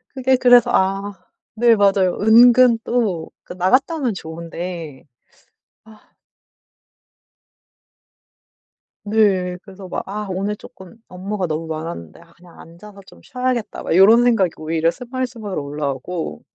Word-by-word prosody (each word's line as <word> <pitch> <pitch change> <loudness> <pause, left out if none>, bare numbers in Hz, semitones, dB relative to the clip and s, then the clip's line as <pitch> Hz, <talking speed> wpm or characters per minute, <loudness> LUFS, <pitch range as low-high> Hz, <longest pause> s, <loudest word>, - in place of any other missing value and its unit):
그게 260 0 +2
그래서 245 -1 +5
아 195 +2 0 0.4
네 235 0 +4
맞아요. 195 -3 +2
은근 235 +2 +6
또 210 -9 -2
그 - - -10
나갔다 255 - +1
오면 255 -7 -1
좋은데. 165 -3 -8 0.8
아. 220 -1 -20 2.9
네. 195 -4 +1
그래서 195 -2 -12
막 - - -4
'아 210 +1 -5
오늘 195 +3 -3
조금 190 0 -15
업무가 190 +1 -4
너무 160 0 -4
많았는데 155 - -7
아 170 0 -21
그냥 175 0 -19
앉아서 200 +5 -14
좀 - - -18
쉬어야겠다.' 250 -3 -3
막 - - -1
요런 220 +6 +6
생각이 225 -8 +2
오히려 160 +1 -1
스멀스멀 245 - -5
올라오고. 140 - -5
195 Hz, 255 characters per minute, -19 LUFS, 170-230 Hz, 2.9 s, 은근